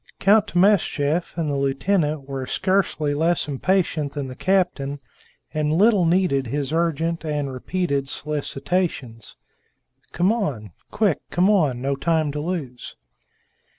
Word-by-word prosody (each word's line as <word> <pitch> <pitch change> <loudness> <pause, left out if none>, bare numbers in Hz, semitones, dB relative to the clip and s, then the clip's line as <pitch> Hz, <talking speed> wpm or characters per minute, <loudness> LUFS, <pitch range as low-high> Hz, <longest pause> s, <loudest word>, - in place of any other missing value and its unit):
Count 210 +2 +4
Timascheff 175 -4 +1
and 165 -2 -1
the 145 - -1
lieutenant 140 +2 0
were 135 -2 -4
scarcely 185 -6 0
less 165 +3 +1
impatient 155 0 0
than 140 -3 -4
the 130 - -8
captain, 175 -6 0 0.5
and 150 -1 0
little 195 +2 +4
needed 165 -6 +2
his 145 +4 -3
urgent 165 0 0
and 145 -3 -2
repeated 140 0 -2
solicitations: 145 - -3 0.7
"Come 180 +6 +2
on! 135 - -3 0.2
Quick! 210 -6 +1
Come 185 +4 +3
on! 145 -11 +1
no 140 0 0
time 155 +1 0
to 150 - -4
lose!" 150 -7 -5
155 Hz, 125 wpm, -23 LUFS, 140-180 Hz, 0.7 s, Count